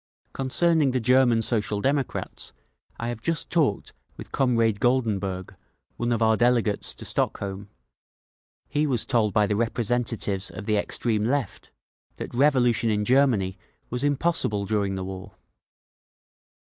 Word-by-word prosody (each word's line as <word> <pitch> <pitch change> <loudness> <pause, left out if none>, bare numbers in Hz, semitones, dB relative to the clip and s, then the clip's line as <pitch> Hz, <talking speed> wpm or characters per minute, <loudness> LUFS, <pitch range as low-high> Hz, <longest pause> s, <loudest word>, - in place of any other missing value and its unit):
Concerning 150 +3 +2
the 130 0 0
German 120 -1 +3
Social 105 -3 0
Democrats, 135 +3 -2 0.5
I 115 - -3
have 120 -2 -5
just 165 +4 -1
talked 150 - 0 0.2
with - - -10
Comrade 115 -5 +1
Goldenberg, 105 -7 0 0.4
one 120 0 -2
of 115 -1 +1
our 110 0 +4
delegates 120 -3 +1
to - - -9
Stockholm; 100 0 -2 1.0
he 150 +1 0
was 125 -6 0
told 115 -5 +1
by 105 +2 +3
the 105 - -1
representatives 115 -3 -1
of 105 - -8
the 105 - +1
Extreme 105 +1 0
Left 130 -4 -2 0.5
that - - -7
revolution 120 -4 +3
in 105 -1 0
Germany 120 -7 +2 0.3
was 125 +2 -2
impossible 145 -8 +1
during 100 -1 -1
the 95 - -4
war…." 95 +2 -8
115 Hz, 135 wpm, -25 LUFS, 105-130 Hz, 1.0 s, our